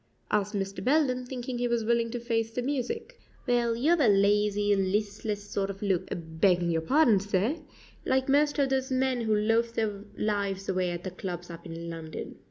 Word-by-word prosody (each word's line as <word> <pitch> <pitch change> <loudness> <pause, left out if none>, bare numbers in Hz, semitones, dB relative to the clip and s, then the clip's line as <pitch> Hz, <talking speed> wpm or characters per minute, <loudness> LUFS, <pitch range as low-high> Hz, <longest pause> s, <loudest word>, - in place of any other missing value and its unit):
asked 210 0 +1
Mr. 195 0 -3
Belden, 255 -2 +2
thinking 250 -1 -4
he 245 - +1
was 235 -1 0
willing 230 +1 +1
to 240 +1 -4
face 230 -1 -1
the 245 +2 -3
music. 280 - -3 0.3
"Well, 240 -2 +2
you 270 +8 +2
'ave 340 -4 +4
a - - +5
lazy, 205 +1 +3
listless 205 +2 -1
sort 200 -1 -2
of 195 +1 -6
look 190 -4 0
begging 170 +1 +1
your 165 -1 +1
pardon, 240 - +4
sir 205 - 0 0.5
like 265 0 +1
most 290 +2 +3
of 280 -2 +2
those 265 0 0
men 260 -1 +1
who 220 -2 +1
loaf 225 +2 +2
their 210 -3 -2
lives 200 -2 -1
away 185 -1 0
at 175 0 -5
the 185 - -4
clubs 175 -1 -6
up 170 +1 -9
in 165 0 -7
London." 160 -1 -7
210 Hz, 190 wpm, -28 LUFS, 195-245 Hz, 0.5 s, a